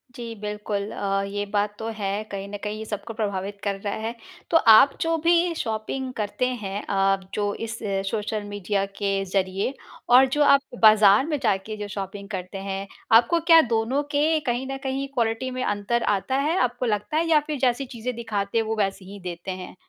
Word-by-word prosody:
जी 235 -1 -6
बिल्कुल। 210 -1 -4
अ, 195 0 -1
ये 205 +1 -3
बात 205 0 0
तो 225 - -4
है 200 0 -2
कहीं 195 0 -5
न 205 - -5
कहीं 210 0 -3
ये 220 - -6
सबको 215 +1 -5
प्रभावित 200 -2 -3
कर 200 -1 0
रहा 205 - -2
है। 230 - -5 0.4
तो 330 - +7
आप 225 +5 +8
जो 330 0 +1
भी 340 0 +4
शॉपिंग 245 +1 -3
करते 215 +3 -2 0.2
हैं 195 +1 -3
अ, 195 0 +1
जो 205 -1 -1
इस 225 0 -5 0.3
सोशल 215 0 -2
मीडिया 205 -1 -2
के 200 -1 -1
ज़रिए 190 +4 -1 0.4
और 250 +2 +8
जो 295 - +4
आप 280 -1 +6 0.2
बाज़ार 215 +1 +7
में 300 -2 -1
जाके 215 0 0
जो 205 -1 -5
शॉपिंग 200 0 -6
करते 190 -1 -5
हैं 195 0 -4 0.3
आपको 245 +9 +3
क्या 330 -1 +9
दोनों 235 +3 0
के 310 +2 +2
कहीं 245 +2 -1
न 270 - -3
कहीं 270 +1 -2
क्वालिटी 235 +1 -1
में 255 0 -3
अंतर 205 +3 0
आता 200 +5 0
है, 300 +6 +1
आपको 245 -4 0
लगता 210 +4 -1
है? 330 - +2
या 310 -2 +6
फिर 305 -1 -2
जैसी 255 +1 +1
चीज़ें 245 0 -5
दिखाते 215 -3 -2
हैं 225 - +2
वो 220 +1 -1
वैसे 195 -2 -1
ही 200 +2 -10
देते 180 0 -6
हैं? 185 -1 -8
215 Hz, 200 wpm, -24 LUFS, 200-250 Hz, 0.4 s, क्या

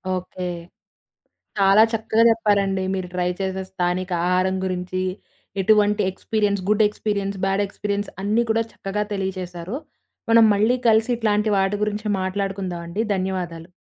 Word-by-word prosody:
Okay. 180 0 -5 1.1
చాలా 200 +2 +6
చక్కగా 225 0 +2
చెప్పారండి. 200 -4 +2
మీరు 185 -1 -3
ట్రై 180 -1 0
చేసే 190 0 -2
స్థానిక 185 0 -1 0.2
ఆహారం 185 +1 +2
గురించి 185 0 -2 0.6
ఎటువంటి 210 +1 +3
experience, 200 0 -1
good 215 +1 +4
experience, 200 -2 -3
bad 195 +1 +1
experience 200 +1 -3
అన్నీ 215 +4 +2
కూడా 225 +1 +2
చక్కగా 200 +2 -3
తెలియజేశారు. 185 0 -4 0.6
మనం 230 0 +7
మళ్ళీ 215 +5 +3
కలిసి 225 +2 +4
ఇట్లాంటి 215 -1 +1
వాటి 195 +1 +1
గురించి 210 0 -2
మాట్లాడుకుందామండి. 190 -1 -3
ధన్యవాదాలు. 180 -3 -4
195 Hz, 120 wpm, -22 LUFS, 185-210 Hz, 1.1 s, మనం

